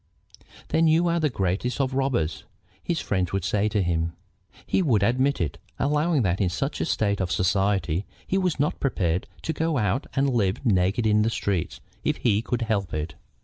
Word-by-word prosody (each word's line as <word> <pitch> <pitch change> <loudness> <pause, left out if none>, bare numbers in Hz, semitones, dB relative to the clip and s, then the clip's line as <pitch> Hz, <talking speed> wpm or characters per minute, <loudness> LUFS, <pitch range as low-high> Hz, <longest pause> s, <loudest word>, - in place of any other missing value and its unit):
"Then 165 0 +3
you 165 +2 +4
are 170 0 +1
the 155 -2 +2
greatest 100 +4 -1
of 135 -1 0
robbers," 130 - 0 0.4
his 170 -3 -1
friends 95 -3 -1
would 95 -2 0
say 105 +1 +1
to 105 -2 +1
him. 85 -1 0 0.5
He - - +1
would 120 - +2
admit 130 +6 +2
it, 75 -5 -2 0.2
allowing 150 0 +2
that 95 +1 0
in 95 - +2
such 135 - -2
a - - +1
state 100 -9 0
of 90 -2 -1
society 95 0 +1 0.2
he 190 - +1
was 180 -5 0
not 145 - 0
prepared 90 -10 0 0.2
to 160 - -1
go 160 0 0
out 110 +4 0
and 135 0 +2
live 110 +2 0
naked 100 +1 +2
in 105 0 +4
the 110 - +2
streets 100 -7 -2 0.2
if - - 0
he 105 -3 +2
could 120 0 -2
help 100 -7 -1
it. 75 +1 -3
105 Hz, 190 wpm, -25 LUFS, 95-135 Hz, 0.5 s, you